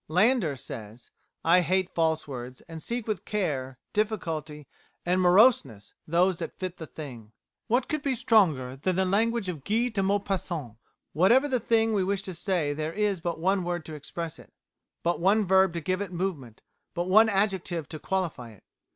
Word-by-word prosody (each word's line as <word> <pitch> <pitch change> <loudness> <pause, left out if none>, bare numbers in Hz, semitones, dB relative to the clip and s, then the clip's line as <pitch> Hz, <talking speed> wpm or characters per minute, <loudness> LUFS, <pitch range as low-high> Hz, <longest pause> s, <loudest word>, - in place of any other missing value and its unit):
Landor 185 - +3
says: 115 -2 -9 0.3
"I 175 +2 +6
hate 185 +2 0
false 160 -2 +1
words, 125 -2 -7
and 165 -1 -10
seek 235 +5 -4
with 215 -3 -2
care, 135 - -2 0.2
difficulty, 160 -9 -2 0.4
and 180 +1 +2
moroseness 175 - +4
those 175 +2 +2
that - - -6
fit 185 -1 -5
the 160 - -8
thing." 120 -9 -10 0.3
What 245 +3 +1
could 305 -1 -2
be 275 -2 0
stronger 160 - +3
than 180 +7 -1
the 190 +1 +2
language 220 +2 +1
of 160 -7 -5
Guy 230 +7 +1
de 210 -4 -1
Maupassant? 190 - -2 0.4
"Whatever 235 - +4
the 260 -3 0
thing 225 0 +2
we 200 -3 +2
wish 195 +1 -1
to 190 -2 -6
say 170 -4 -1
there 155 +2 -3
is 205 -2 0
but 170 0 -3
one 190 +2 +1
word 175 -2 -3
to 155 - -8
express 160 +2 -6
it, - - -16 0.5
but 170 +1 0
one 200 +4 +3
verb 190 0 +4
to 170 - -3
give 185 +4 -1
it 200 -3 -4
movement, 170 - -4 0.3
but 175 0 -1
one 215 +4 +6
adjective 190 -6 0
to 155 - -6
qualify 160 -11 -3
it. 105 - -21
180 Hz, 180 wpm, -27 LUFS, 155-200 Hz, 0.5 s, I